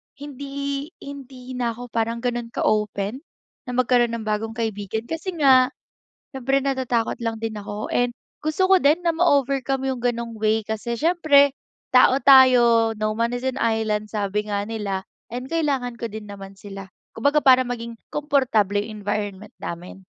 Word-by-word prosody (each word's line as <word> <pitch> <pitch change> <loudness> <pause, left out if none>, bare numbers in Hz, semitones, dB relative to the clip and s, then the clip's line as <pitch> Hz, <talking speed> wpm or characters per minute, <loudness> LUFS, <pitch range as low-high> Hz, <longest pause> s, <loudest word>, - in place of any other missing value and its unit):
hindi, 280 0 -5
hindi 265 -2 -10
na 235 -2 -1
ako 245 0 -9
parang 230 +1 -1
ganon 240 -1 -2
ka - - -1
open 210 +2 0 0.5
na 250 - -4
magkaroon 245 -2 +2
ng 230 - -5
bagong 215 +1 -2
kaibigan 220 -1 -3
kasi 325 +8 -5
nga, 265 -5 +5 0.6
siyempre 270 +1 0
natatakot 260 -4 -1
lang 225 -1 -4
din 225 -1 -3
ako 205 +1 -6
and 245 0 +1 0.3
gusto 310 +5 0
ko 380 - +7
din 310 +3 +3
na 340 - +3
ma-overcome 275 -5 +1
yung 255 - -4
ganong 235 -1 -2
way 220 +1 +1
kasi 220 +2 -3
siyempre, 295 -1 +4 0.4
tao 255 0 +6
tayo 240 -4 +6
no 215 0 -1
man 230 +3 -1
is 245 - -5
an 260 0 -2
island 220 -2 0
sabi 210 -1 -2
nga 200 -1 -1
nila 205 -3 -3 0.2
and 250 +3 -6
kailangan 270 -7 -1
ko 230 - -3
din 220 0 -8
naman 195 -1 -10
sila. 195 -1 -9 0.2
Kumbaga 285 +6 +1
para 255 -1 +6
maging 235 -1 -6 0.2
komportable 260 -9 +1
environment 205 -1 -4
namin. 180 +3 -8
235 Hz, 160 wpm, -23 LUFS, 215-270 Hz, 0.6 s, ko